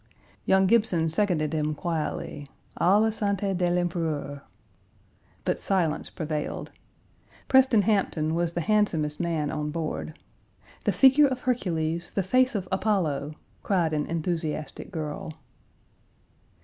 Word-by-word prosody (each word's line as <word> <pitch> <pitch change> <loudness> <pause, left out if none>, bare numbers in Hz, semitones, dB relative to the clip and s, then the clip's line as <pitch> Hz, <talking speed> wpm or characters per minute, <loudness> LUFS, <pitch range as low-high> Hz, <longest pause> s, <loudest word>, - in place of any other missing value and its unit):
Young 190 0 +5
Gibson 185 -7 +2
seconded 165 -5 0
him 155 -1 0
quietly, 155 -3 -3 0.3
"À 190 +4 +5
la 220 +1 +3
santé 200 -2 -1
de 175 -1 +1
l'Empereur." 165 -5 -2 1.0
But - - 0
silence 170 -5 0
prevailed. 155 -2 -4 0.8
Preston 260 -5 +5
Hampton 180 -6 +1
was 170 0 0
the 175 - -1
handsomest 165 -7 +1
man 165 -4 -1
on 150 0 -2
board 155 0 -4 0.7
"the - - +3
figure 275 +2 +6
of 255 -1 -3
Hercules, 170 -9 -1
the 195 - -1
face 255 +6 +2
of 190 -3 -2
Apollo," 155 -8 0 0.3
cried 175 -5 +1
an 150 -1 -1
enthusiastic 160 -2 -3
girl. 155 -3 -5
170 Hz, 120 wpm, -26 LUFS, 155-200 Hz, 1.0 s, figure